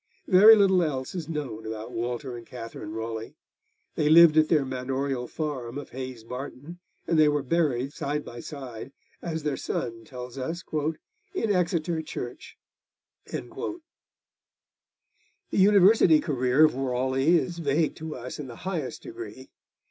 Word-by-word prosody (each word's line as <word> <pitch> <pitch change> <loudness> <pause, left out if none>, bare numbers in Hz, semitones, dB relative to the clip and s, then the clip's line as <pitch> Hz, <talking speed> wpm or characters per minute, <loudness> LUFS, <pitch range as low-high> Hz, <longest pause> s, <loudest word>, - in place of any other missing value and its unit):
Very 210 +3 +9
little 190 -3 +4
else 135 -6 -2
is 170 -4 -5
known 145 -9 -4
about 110 +1 -6
Walter 120 +1 -3
and 120 - -8
Katherine 115 -3 -8
Raleigh. 110 0 -5 0.6
They 150 - +1
lived 165 0 +8
at 155 0 +4
their 150 -4 +3
manorial 130 0 -2
farm 135 -5 -4
of 145 - -8
Hayes 130 -3 -6
Barton, 135 +7 -8 0.3
and 165 - +2
they 155 -1 +6
were 145 -1 0
buried 140 -3 0
side 150 -1 -3
by 120 - -8
side, 130 -2 -8 0.3
as 160 -3 -4
their 150 -3 -1
son 115 -1 -4
tells 125 +1 -8
us, 165 +7 -4
'in 210 - -3
Exeter 170 -3 0
church.' 155 - -7 0.7
The 335 - -5 1.7
university 195 -4 +6
career 130 +1 +3
of 155 - +2
Raleigh 130 +4 +2
is 170 +1 -3
vague 155 0 +1
to 160 -1 -6
us 125 +3 -7
in 145 - -5
the 120 - -9
highest 170 -8 -3
degree. 360 +1 -9
145 Hz, 140 wpm, -27 LUFS, 125-165 Hz, 1.7 s, Very